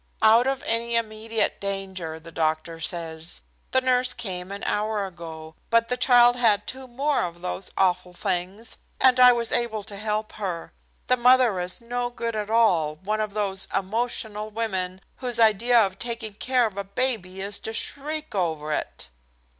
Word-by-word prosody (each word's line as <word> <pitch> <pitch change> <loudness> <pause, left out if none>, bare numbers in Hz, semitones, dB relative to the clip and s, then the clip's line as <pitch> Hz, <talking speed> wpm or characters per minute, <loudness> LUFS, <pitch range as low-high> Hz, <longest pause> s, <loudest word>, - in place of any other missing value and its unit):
"Out 225 +3 +6
of 270 0 -1
any 230 +1 -1
immediate 225 0 0
danger, 190 -5 -4
the 165 +1 -13
doctor 160 0 -1
says. 165 0 -4 0.3
The 260 - +2
nurse 255 -1 +2
came 185 -5 -4
an 200 0 -6
hour 210 -1 -1
ago, 160 -3 -9 0.2
but 230 0 +3
the 250 - +1
child 245 -1 +5
had 210 -4 +3
two 260 0 -6
more 275 +4 0
of 175 0 -6
those 180 +1 -3
awful 180 -1 +1
things, 190 +4 -3 0.2
and 255 -1 +5
I 250 0 +9
was 235 -1 0
able 220 -3 -1
to 200 -1 -6
help 215 +1 -2
her. 185 -5 -5 0.3
The 255 - +2
mother 250 -4 +5
is 180 +6 -2
no 245 +1 -3
good 235 -1 -4
at 210 -1 -3
all, 180 -10 +3
one 210 +7 -2
of 215 -1 -4
those 195 -2 +1
emotional 215 +1 -2
women 190 -4 -3 0.2
whose 245 -2 0
idea 230 +2 +4
of 195 0 -6
taking 230 -3 -2
care 250 +3 +1
of 210 -3 -5
a - - -2
baby 200 -3 -1
is 200 +1 -1
to 220 - -5
shriek 300 +6 -3
over 160 -5 -1
it." - - -4
215 Hz, 170 wpm, -25 LUFS, 185-240 Hz, 0.3 s, I